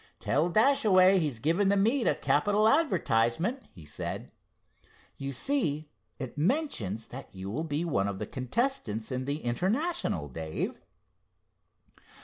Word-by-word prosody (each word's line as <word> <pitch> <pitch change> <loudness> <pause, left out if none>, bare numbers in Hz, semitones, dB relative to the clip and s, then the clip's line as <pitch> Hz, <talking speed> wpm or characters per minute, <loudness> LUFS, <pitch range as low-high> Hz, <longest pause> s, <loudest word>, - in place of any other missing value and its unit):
'Tell 155 +5 +1
Dashaway 195 -4 +5
he's 150 -8 -1
given 170 - +2
the 200 - +3
meet 230 +6 +2
a - - +3
capital 210 +1 +2
advertisement,' 185 - +2
he 85 -4 -14
said. 75 - -5 0.8
You 140 0 -5
see, 155 - -1 0.3
it 130 -2 -6
mentions 150 - -1
that 135 +2 -8
you 95 +1 -6
will 155 +9 -2
be 155 +2 -2
one 100 -12 0
of 100 -1 -3
the - - -4
contestants 130 - -2
in 130 0 -2
the 145 +3 -3
International, 185 - -1
Dave." 80 +3 -4
155 Hz, 130 wpm, -29 LUFS, -, 0.8 s, Dashaway